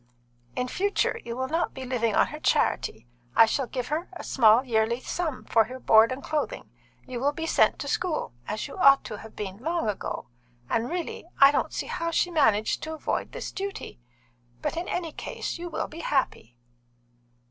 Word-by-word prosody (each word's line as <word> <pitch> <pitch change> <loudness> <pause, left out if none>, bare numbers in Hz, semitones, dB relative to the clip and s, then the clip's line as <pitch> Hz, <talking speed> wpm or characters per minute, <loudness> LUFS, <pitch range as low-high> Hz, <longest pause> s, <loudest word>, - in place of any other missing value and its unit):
In 250 - -1
future, 400 +9 0
you 235 0 -5
will 260 0 -1
not 325 +4 -1
be 265 - -6
living 235 -4 0
on - - +5
her - - -7
charity. - - +1 0.3
I - - +8
shall 260 +3 -1
give 250 -1 -4
her 315 +4 -2
a 355 - -8
small 230 -1 +5
yearly 230 -1 +1
sum 315 0 -3
for 225 -2 +3
your 255 +2 -8
board 220 -1 +6
and 260 +1 -5
clothing. 310 -2 -3 0.3
You 255 -2 -5
will 285 +3 +1
be 325 +2 -4
sent - - +3
to - - -5
school, 325 - -1
as 210 0 -3
you - - -10
ought 275 -6 +6
to 210 - -7
have 220 - -12
been 195 -2 -5
long 330 +2 -1
ago, 205 -2 -3 0.5
and 230 +1 +1
really 345 -1 -4
I 275 +1 +9
don't - - 0
see - - -3
how 335 - -2
she 350 +1 +1
managed 220 -10 +2
to 315 0 -4
avoid 310 - -2
this - - -6
duty. 395 - -6 0.6
But - - -1
in 340 +2 -3
any 340 -3 -2
case 335 - -5
you 350 0 -5
will - - -2
be 320 - -10
happy." 260 - -1
265 Hz, 195 wpm, -27 LUFS, 230-325 Hz, 0.6 s, I